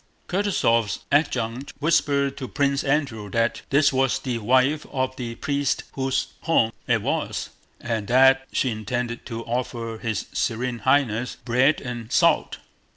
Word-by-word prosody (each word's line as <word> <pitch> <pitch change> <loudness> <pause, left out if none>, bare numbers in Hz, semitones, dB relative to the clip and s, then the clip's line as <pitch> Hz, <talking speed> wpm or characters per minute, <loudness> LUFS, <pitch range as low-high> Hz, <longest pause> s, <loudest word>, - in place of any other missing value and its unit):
Kutúzov's 145 - +1
adjutant 135 -3 0
whispered 140 -3 +2
to 130 - -5
Prince 140 0 0
Andrew 135 -8 -1
that 115 +3 0
this 140 +1 +4
was 135 -1 +2
the 125 -3 -3
wife 130 +7 +2
of 130 -1 -1
the 120 -3 -5
priest 140 +1 -1
whose 135 -1 -1
home 115 -9 +2 0.2
it - - +2
was, - - -2 0.3
and 110 -4 -3
that 135 +2 +5
she 130 - +1
intended 120 +2 -4
to 115 -2 -6
offer 115 -2 -3
his 110 -4 -2
Serene 120 +1 -1
Highness 125 -1 +1
bread 130 +5 +3
and 120 -3 -6
salt. - - +3
125 Hz, 140 wpm, -24 LUFS, 115-140 Hz, 0.3 s, that